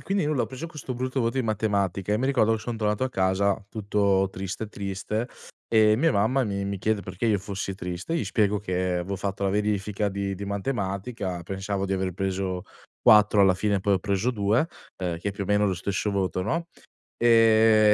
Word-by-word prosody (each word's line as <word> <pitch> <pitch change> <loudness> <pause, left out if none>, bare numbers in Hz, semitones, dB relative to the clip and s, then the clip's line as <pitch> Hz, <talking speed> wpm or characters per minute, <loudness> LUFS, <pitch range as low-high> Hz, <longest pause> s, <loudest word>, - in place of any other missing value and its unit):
e - - -17
quindi 195 -4 0
nulla, 150 -4 +1
ho - - -2
preso 135 +6 -7
questo 145 -5 -6
brutto 130 +2 -2
voto 115 +2 0
in 130 - +1
matematica 100 -3 0
e - - +3
mi 130 - 0
ricordo 115 -5 +3
che 110 - -1
son 120 0 -4
tornato 105 +2 0
a 130 - +1
casa 95 -1 +1
tutto 100 -2 +1
triste, 95 +3 -5
triste, 100 +3 -3 0.4
e 110 -1 +4
mia 165 +5 +3
mamma 125 +7 +2
mi 100 -2 -2
mi 100 -1 -3
chiede 110 +1 0
perché 95 +4 -4
io 105 -3 +3
fossi 95 -1 -4
triste. 90 - -4
Gli 145 - 0
spiego 105 0 +1
che 95 -3 -4 0.2
avevo 95 +3 -3
fatto 100 +1 -4
la 100 - +2
verifica 105 0 0
di 100 0 -3
di 100 - -5
matematica, 100 -2 -3
pensavo 95 +2 -3
di 95 - -2
aver 95 -1 -1
preso 95 0 -2 0.4
4, 105 -1 +6
alla 95 -2 +6
fine 100 +1 0
poi 100 +1 +2
ho 95 - +1
preso 100 +5 0
2, 110 +7 +1 0.3
ehm, 90 -3 -2
che 100 +3 -3
più 100 - -5
o - - -4
meno 105 0 +3
è - - +3
lo 95 - +1
stesso 100 +3 -2
voto, 95 -2 -1
no, 165 - -2 0.5
ehm, 110 -2 +5
100 Hz, 210 wpm, -26 LUFS, 95-110 Hz, 0.5 s, 4